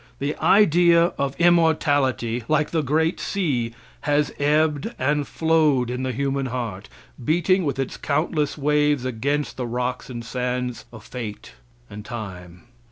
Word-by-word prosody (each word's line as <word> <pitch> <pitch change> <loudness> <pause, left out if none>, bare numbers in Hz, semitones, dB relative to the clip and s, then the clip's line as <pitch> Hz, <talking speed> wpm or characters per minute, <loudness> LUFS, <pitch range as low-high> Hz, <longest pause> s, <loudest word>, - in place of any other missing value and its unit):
The 145 +2 -2
idea 170 -3 +4
of 140 +1 -2
immortality, 145 -8 +2
like 155 -1 +1
the 160 - +1
great 160 +4 +1
sea, 130 -12 -1 0.3
has 145 0 +1
ebbed 150 0 +1
and 145 +2 0
flowed 155 -6 +2
in 125 +1 -3
the 130 0 -1
human 135 +1 -1
heart, 115 -6 -5 0.3
beating 175 +5 +2
with 140 - -1
its 135 -1 -3
countless 150 0 -1
waves 150 -2 +2
against 140 +4 -2
the 125 -2 -3
rocks 125 +2 -3
and 120 -2 -6
sands 125 -1 -3
of 110 -3 -12
fate 115 - -7 0.3
and 105 +1 -9
time. 90 -6 -8
140 Hz, 140 wpm, -23 LUFS, 125-155 Hz, 0.3 s, idea